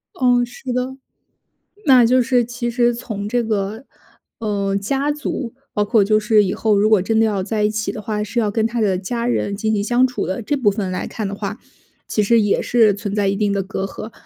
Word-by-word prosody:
嗯， 245 Hz, -1 st, +3 dB
是 245 Hz, +1 st, -8 dB
的。 255 Hz, +1 st, -2 dB, 0.9 s
那 255 Hz, -4 st, +7 dB
就 255 Hz, +3 st, +4 dB
是 245 Hz, 0 st, +2 dB
其 240 Hz, 0 st, -4 dB
实 240 Hz, 0 st, +2 dB
从 215 Hz, -4 st, -5 dB
这 245 Hz, +2 st, +1 dB
个， 220 Hz, +2 st, -2 dB, 0.5 s
呃， 200 Hz, -3 st, -1 dB
家 270 Hz, +8 st, -1 dB
族， 290 Hz, -5 st, -4 dB, 0.2 s
包 210 Hz, -, +1 dB
括 205 Hz, 0 st, +3 dB
就 215 Hz, +1 st, +3 dB
是 210 Hz, 0 st, +4 dB
以 190 Hz, -, -1 dB
后 215 Hz, -2 st, +1 dB
如 210 Hz, -, +3 dB
果 215 Hz, -, +5 dB
真 220 Hz, +4 st, 0 dB
的 225 Hz, -, +4 dB
要 205 Hz, -3 st, 0 dB
在 210 Hz, +2 st, -1 dB
一 210 Hz, -, +2 dB
起 215 Hz, 0 st, -2 dB
的 215 Hz, -, -7 dB
话， 210 Hz, -1 st, -2 dB
是 215 Hz, +3 st, -3 dB
要 215 Hz, -3 st, +1 dB
跟 220 Hz, +1 st, +1 dB
他 230 Hz, +1 st, -2 dB
的 195 Hz, -4 st, +1 dB
家 235 Hz, +5 st, -3 dB
人 200 Hz, -4 st, -1 dB
进 220 Hz, +1 st, -1 dB
行 205 Hz, -2 st, 0 dB
相 245 Hz, +4 st, +3 dB
处 250 Hz, -, -4 dB
的， 190 Hz, +6 st, -3 dB
这 285 Hz, +7 st, -1 dB
部 235 Hz, -6 st, +3 dB
分 195 Hz, -2 st, -3 dB
来 185 Hz, -, -3 dB
看 215 Hz, -, -4 dB
的 195 Hz, -, -4 dB
话， 205 Hz, +2 st, -5 dB, 0.5 s
其 210 Hz, -, 0 dB
实 230 Hz, +2 st, +4 dB
也 205 Hz, -1 st, +2 dB
是 225 Hz, -3 st, +3 dB
存 200 Hz, 0 st, -5 dB
在 205 Hz, -2 st, +1 dB
一 195 Hz, -, 0 dB
定 205 Hz, -1 st, +1 dB
的 200 Hz, -1 st, 0 dB
隔 195 Hz, 0 st, -4 dB
阂。 215 Hz, +2 st, -7 dB
215 Hz, 255 characters per minute, -20 LUFS, 205-240 Hz, 0.9 s, 那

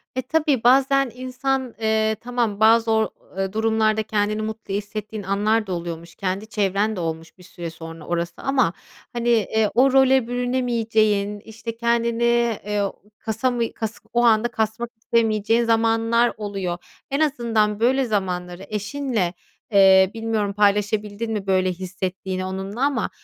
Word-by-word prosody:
E, 260 Hz, -, 0 dB
tabii 290 Hz, -2 st, +1 dB
bazen 270 Hz, +1 st, +4 dB
insan, 255 Hz, 0 st, -2 dB
eee, 220 Hz, 0 st, +2 dB
tamam, 235 Hz, -4 st, -1 dB
bazı 225 Hz, +1 st, +5 dB
o 220 Hz, 0 st, +2 dB, 0.3 s
eee, 195 Hz, 0 st, -2 dB
durumlarda 220 Hz, 0 st, +1 dB
kendini 215 Hz, 0 st, -1 dB
mutlu 215 Hz, -2 st, -5 dB
hissettiğin 210 Hz, +1 st, -5 dB
anlar 210 Hz, +3 st, +1 dB
da 185 Hz, -, -2 dB
oluyormuş. 170 Hz, -1 st, -6 dB
Kendi 195 Hz, +2 st, -3 dB
çevren 205 Hz, +1 st, 0 dB
de -, -, -5 dB
olmuş 165 Hz, -1 st, -5 dB
bir 180 Hz, -, -16 dB
süre 175 Hz, -1 st, -7 dB
sonra 165 Hz, -1 st, -10 dB
orası 170 Hz, 0 st, -2 dB
ama, 265 Hz, -10 st, +1 dB, 0.4 s
hani, 240 Hz, 0 st, -1 dB
eee, 220 Hz, -1 st, +2 dB
o 260 Hz, +3 st, +5 dB
role 265 Hz, -2 st, +4 dB
bürünemeyeceğin, 225 Hz, -5 st, 0 dB
işte, 225 Hz, +2 st, -8 dB
kendini, 235 Hz, 0 st, +1 dB, 0.4 s
eee, 210 Hz, 0 st, -1 dB
o 200 Hz, -, -1 dB, 0.3 s
kasamı 235 Hz, +1 st, -1 dB
kas 220 Hz, -1 st, -5 dB
o 240 Hz, 0 st, +3 dB
anda 230 Hz, 0 st, +4 dB
kasmak 225 Hz, 0 st, -2 dB
istemeyeceğin 225 Hz, 0 st, +1 dB
zamanlar 230 Hz, +1 st, +2 dB
oluyor. 195 Hz, -4 st, -3 dB, 0.3 s
En 275 Hz, -, 0 dB
azından 230 Hz, -8 st, +1 dB
böyle 260 Hz, +3 st, +3 dB
zamanları 185 Hz, -4 st, -3 dB
eşinle, 210 Hz, -3 st, -2 dB, 0.4 s
eee, 190 Hz, -2 st, +6 dB
bilmiyorum, 225 Hz, -3 st, -1 dB
paylaşabildin 210 Hz, +2 st, +1 dB
mi 205 Hz, -3 st, -3 dB
böyle 185 Hz, -1 st, +2 dB
hissettiğini 185 Hz, +1 st, -4 dB
onunla 190 Hz, +5 st, -5 dB
ama 275 Hz, -6 st, 0 dB
220 Hz, 140 wpm, -22 LUFS, 195-235 Hz, 0.4 s, eee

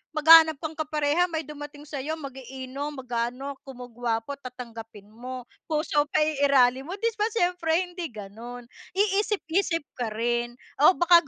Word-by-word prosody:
maghahanap 320 Hz, +1 st, +8 dB
kang 315 Hz, 0 st, -5 dB
kapareha 305 Hz, +2 st, +1 dB
may 320 Hz, -1 st, -2 dB
dumating 295 Hz, 0 st, -9 dB
sa'yo 295 Hz, +1 st, -4 dB
mag-iinom, 270 Hz, 0 st, -6 dB
mag-aano 255 Hz, +2 st, -3 dB
kumo 250 Hz, -2 st, -9 dB
gwapo 235 Hz, +3 st, -2 dB
tatanggapin 230 Hz, -5 st, -10 dB
mo. 250 Hz, +2 st, -7 dB, 0.2 s
Puso 300 Hz, -1 st, +1 dB
paiiralin 275 Hz, -3 st, +3 dB
mo, 375 Hz, -, -4 dB
'di 460 Hz, +3 st, 0 dB
ba 425 Hz, -, +3 dB
siyempre 350 Hz, -4 st, +1 dB
hindi 355 Hz, -2 st, -5 dB
ganon. 230 Hz, +3 st, -9 dB, 0.3 s
Iisip-isip 390 Hz, -4 st, +1 dB, 0.2 s
ka 240 Hz, -, 0 dB
rin 240 Hz, +1 st, -1 dB, 0.2 s
o 330 Hz, +5 st, +7 dB
baka 345 Hz, -3 st, +5 dB
285 Hz, 135 wpm, -26 LUFS, 245-320 Hz, 0.3 s, maghahanap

